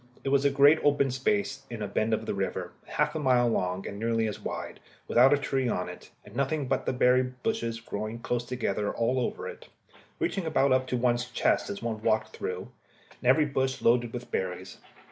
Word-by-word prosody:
It 135 - -1
was 140 0 +3
a - - +6
great 140 +3 +6
open 140 -2 +3
space 205 - 0
in 115 -3 -5
a - - -2
bend 110 +3 0
of 110 - 0
the - - -2
river, - - -3
half - - 0
a 160 - -2
mile 125 -4 +3
long 90 -4 -1
and 100 - -6
nearly 115 0 +1
as 105 - -5
wide, - - -6 0.3
without 125 +3 +6
a 145 - +5
tree 135 -3 -1
on 90 -4 -2
it, 90 - -11 0.2
and - - -14
nothing 140 +1 0
but 135 - +2
just - - -12
the - - +1
blue - - -7
berry 125 +1 +5 0.2
bushes 115 - -1
growing 110 0 -5
close 120 +1 -2
together 120 -4 -2
all 125 +3 0
over 125 - -3
it, - - -9 0.5
reaching 190 -4 -1
about 140 -3 +2
up 130 0 +3
to 125 - -1
one's 120 0 +1
chest - - +1
as 100 - -5
one 110 -2 -3
walked 110 -1 0
through, 90 0 -5 0.5
and 125 - +2
every 150 +4 +5
bush 135 -2 -1
loaded 120 0 +3
with 125 0 -7
berries. 95 0 -4
125 Hz, 220 wpm, -28 LUFS, 110-135 Hz, 0.5 s, a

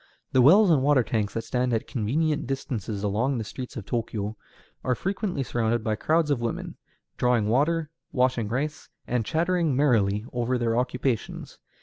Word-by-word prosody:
The 130 - +4
wells 185 - +7
and 150 -5 +4
water 140 -2 +4
tanks 105 -4 -2
that 115 - -2
stand 125 +1 0
at 110 - 0
convenient 145 +7 -1
distances 115 -6 -3
along 115 +7 0
the 115 - -2
streets 125 +4 -7
of 105 - -6
Tōkyō 110 -3 -2 0.5
are 125 - +1
frequently 190 - -2
surrounded 120 -2 0
by 110 -1 0
crowds 155 +6 +1
of 130 -4 +1
women, 115 -1 -3 0.4
drawing 125 -4 +2
water, 150 +6 +1 0.2
washing 125 -3 +1
rice, 150 +7 -3 0.2
and 120 -1 0
chattering 165 +1 +1
merrily 110 -7 +2
over 125 +1 0
their 115 -1 0
occupations. 125 -1 -2
125 Hz, 160 wpm, -26 LUFS, 115-145 Hz, 0.5 s, wells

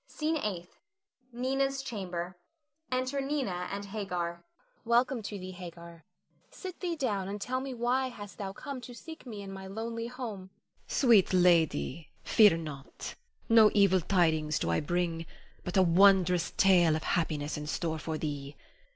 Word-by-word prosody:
SCENE 315 +1 -1
EIGHTH. 185 - -5 0.5
[Nina's 270 +2 -1
chamber. 185 -7 -4 0.6
Enter 255 +2 0
Nina 265 -11 -2
and 200 +1 -4
Hagar.] 185 -4 -3
Nina. - - -28 0.4
Welcome 240 +2 +2
to 205 0 -5
thee, 185 -1 -7
Hagar; 170 -2 -10 0.4
sit 370 -2 -8
thee 350 -2 -2
down 210 - -1
and 205 +1 -4
tell 255 +5 -2
me 265 -1 -5
why 250 +3 +1
hast 205 -5 -10
thou 195 -2 -3
come 275 +5 -7
to 245 0 -10
seek 320 +3 -10
me 210 -4 -6
in 195 - -8
my 190 0 -8
lonely 230 +3 -4
home? 230 -7 -6
Hagar. 190 - -44
Sweet 230 -9 +4
lady, 165 - +2
fear 210 -6 +6
not; 150 -4 -7 0.3
no 225 -2 +7
evil 195 -3 +5
tidings 160 -4 +2
do 85 - -1
I 85 - +2
bring, 165 0 -1 0.4
but 180 - -2
a 190 - +7
wondrous 180 -1 +5
tale 175 -5 +5
of 155 - -3
happiness 150 -3 -1
in 150 -1 -5
store 160 0 -2
for 160 0 -3
thee. 145 -2 -4
195 Hz, 160 wpm, -30 LUFS, 170-240 Hz, 0.6 s, no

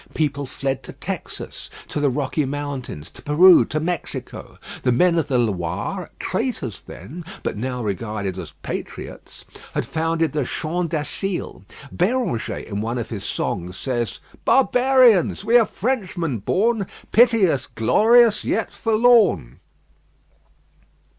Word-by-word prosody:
People 145 -3 -1
fled 135 +1 -3
to - - -9
Texas, - - -6 0.2
to - - -2
the 145 -1 +2
Rocky 140 +3 -1
Mountains, 135 - -5
to - - -13
Peru, 170 +5 +7
to 155 - -2
Mexico. 175 +3 -5 0.2
The 125 - +2
men 170 +8 +3
of 155 - -1
the 135 -3 +1
Loire, 105 - -2
traitors 185 - -3
then, 150 - -10 0.2
but - - -2
now 125 +3 -3
regarded 100 -2 -3
as 85 -4 -8
patriots, - - -7 0.3
had - - 0
founded 165 -1 0
the 150 -2 0
Champ 165 +6 -2
d'Asile. 170 - -3 0.3
Béranger 180 - -1
in 100 -1 -4
one 115 +3 -2
of 115 - -4
his 105 -4 -5
songs 90 +2 -3
says 120 -4 -2 0.2
"Barbarians! 250 -7 +4
we 230 +2 +3
are 225 - +2
Frenchmen 185 - -2
born; 205 - +1 0.2
Pity 230 -4 +5
us, 140 -5 -1
glorious, 220 - +4
yet 225 - -1
forlorn." 225 - +3
150 Hz, 130 wpm, -22 LUFS, 120-195 Hz, 0.3 s, Peru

